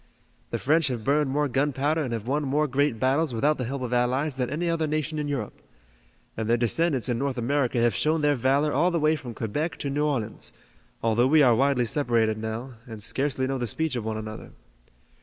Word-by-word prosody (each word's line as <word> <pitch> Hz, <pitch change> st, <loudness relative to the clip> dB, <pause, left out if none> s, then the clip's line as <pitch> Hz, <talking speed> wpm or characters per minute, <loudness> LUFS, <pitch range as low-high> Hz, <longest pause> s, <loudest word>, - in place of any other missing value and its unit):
The -, -, -2 dB
French 155 Hz, +2 st, +2 dB
have 120 Hz, -4 st, -3 dB
burned 145 Hz, +3 st, +2 dB
more 145 Hz, +2 st, +1 dB
gunpowder 145 Hz, +4 st, 0 dB
and 130 Hz, -, -4 dB
have 115 Hz, -2 st, -3 dB
won 140 Hz, +4 st, 0 dB
more 145 Hz, +2 st, +1 dB
great 140 Hz, -3 st, 0 dB
battles 135 Hz, +2 st, +1 dB
without 145 Hz, +6 st, +1 dB
the 125 Hz, -, -1 dB
help 135 Hz, +2 st, -4 dB
of 125 Hz, -1 st, -3 dB
allies 130 Hz, +4 st, +1 dB
than 125 Hz, -2 st, -2 dB
any 160 Hz, +5 st, -2 dB
other 165 Hz, -2 st, 0 dB
nation 155 Hz, 0 st, -1 dB
in 150 Hz, -, -2 dB
Europe. 135 Hz, -7 st, -4 dB, 0.7 s
And 110 Hz, 0 st, -3 dB
their 120 Hz, -, +4 dB
descendants 130 Hz, +3 st, +1 dB
in 120 Hz, -2 st, -1 dB
North 135 Hz, -1 st, -2 dB
America 125 Hz, 0 st, 0 dB
have 120 Hz, 0 st, +3 dB
shown 155 Hz, +1 st, +1 dB
their 145 Hz, 0 st, +3 dB
valor 140 Hz, +3 st, +1 dB
all 175 Hz, -, +3 dB
the 170 Hz, -2 st, 0 dB
way 155 Hz, +1 st, +3 dB
from 125 Hz, -6 st, -8 dB
Quebec 145 Hz, +10 st, -2 dB
to 140 Hz, -, -3 dB
New 145 Hz, +2 st, 0 dB
Orleans, 115 Hz, -7 st, -3 dB, 0.5 s
although 115 Hz, +2 st, +3 dB
we 155 Hz, +2 st, +5 dB
are 125 Hz, -3 st, +6 dB
widely 130 Hz, 0 st, +2 dB
separated 115 Hz, -4 st, +1 dB
now, 110 Hz, +4 st, -5 dB
and 110 Hz, -3 st, -7 dB
scarcely 135 Hz, +2 st, -1 dB
know 135 Hz, 0 st, -2 dB
the 120 Hz, -, -2 dB
speech 160 Hz, +6 st, -2 dB
of 120 Hz, -, -2 dB
one 110 Hz, 0 st, -3 dB
another." 110 Hz, 0 st, -8 dB
135 Hz, 215 wpm, -26 LUFS, 120-150 Hz, 0.7 s, are